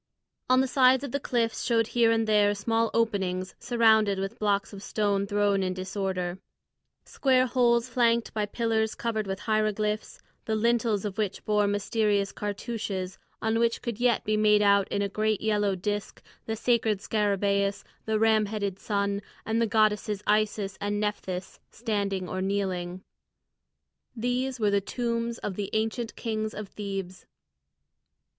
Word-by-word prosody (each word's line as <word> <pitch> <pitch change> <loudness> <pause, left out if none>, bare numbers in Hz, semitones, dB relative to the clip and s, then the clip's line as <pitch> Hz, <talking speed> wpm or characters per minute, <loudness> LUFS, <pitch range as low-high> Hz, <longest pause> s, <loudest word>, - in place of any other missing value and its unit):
On 255 0 +5
the 265 - +1
sides 260 0 +4
of 280 - -5
the 280 - -1
cliffs 235 -4 -1
showed 230 -2 +2
here 235 -1 +3
and 225 0 +2
there 205 -1 +4
small 225 +2 0
openings 190 -5 0
surrounded 220 -4 +3
with 195 0 -4
blocks 205 -1 0
of 195 - -8
stone 200 -2 0
thrown 205 -1 +2
in 185 -1 -1
disorder: 185 -1 -3 0.7
square 260 -2 +2
holes 240 -1 +2
flanked 235 -1 +1
by 210 -1 -1
pillars 220 0 0
covered 220 -3 -2
with 195 0 -4
hieroglyphs, 215 -1 -1 0.3
the 220 - 0
lintels 225 -2 +1
of 205 +1 -4
which 205 -2 -2
bore 210 -1 +2
mysterious 205 0 +1
cartouches 205 -3 -4 0.2
on 220 +1 +1
which 235 0 +1
could 235 -2 -4
yet 245 -2 +2
be 215 - +1
made 210 -1 +4
out 200 -1 +4
in 200 - -1
a - - 0
great 215 +1 0
yellow 210 -2 +1
disc 205 +2 -4 0.2
the 220 - -1
sacred 225 -2 +1
scarabæus, 200 -1 0 0.2
the 220 0 +1
ram 220 -1 +3
headed 200 -2 -3
sun, 200 -1 -1 0.2
and 225 +1 0
the 230 - +2
goddesses 210 -1 +1
Isis 210 -2 0
and 205 0 -1
Nephthys 190 -3 -3
standing 200 -5 -2
or 185 +1 -3
kneeling. 185 -2 -2 1.1
These 245 +2 -1
were 210 -2 +2
the 200 0 +2
tombs 235 +1 -2
of 205 - -4
the 200 0 -3
ancient 225 +2 -1
kings 215 -1 -3
of 210 -1 -6
Thebes. 195 -3 -6
210 Hz, 155 wpm, -27 LUFS, 200-230 Hz, 1.1 s, On